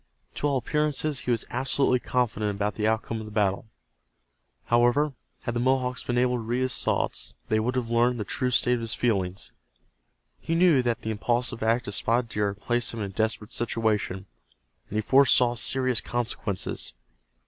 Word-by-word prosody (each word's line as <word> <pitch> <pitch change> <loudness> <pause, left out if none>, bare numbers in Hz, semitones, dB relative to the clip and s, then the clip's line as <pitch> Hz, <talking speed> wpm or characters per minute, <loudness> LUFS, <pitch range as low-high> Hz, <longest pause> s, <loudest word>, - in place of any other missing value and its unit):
To 145 - -1
all 140 -2 +1
appearances 150 +1 0
he - - -5
was 115 -2 +1
absolutely 130 -1 +1
confident 115 -4 -1
about 105 +1 -1
the 105 +1 -1
outcome 110 0 -1
of 110 - -7
the - - -9
battle. 105 0 0 1.0
However, 120 +5 +3 0.3
had 120 - -3
the 120 - -1
Mohawks 125 0 0
been 120 - -2
able 125 0 +2
to - - -4
read 120 +3 -2
his 130 -1 0
thoughts - - -1
they 110 - +2
would 125 +4 -1
have 120 -2 -2
learned 120 +1 +2
the - - -1
true 125 +5 -2
state 125 0 +3
of 125 - 0
his 115 -1 +2
feelings. 95 -5 -1 0.9
He 165 - -2
knew 170 -6 +5
that 120 -2 -1
the 110 - -2
impulsive 120 +2 -1
act 115 +2 +1
of 105 - -3
Spotted 115 +3 +1
Deer 105 -2 0
had 100 0 -14
placed 120 0 +1
them 115 - -3
in 100 -2 -4
a - - -19
desperate 110 +2 -2
situation, 110 -5 -1 0.6
and 105 - -3
he - - +2
foresaw 125 0 +5
serious 130 0 +2
consequences. 100 - -3
120 Hz, 185 wpm, -26 LUFS, 110-125 Hz, 1.0 s, knew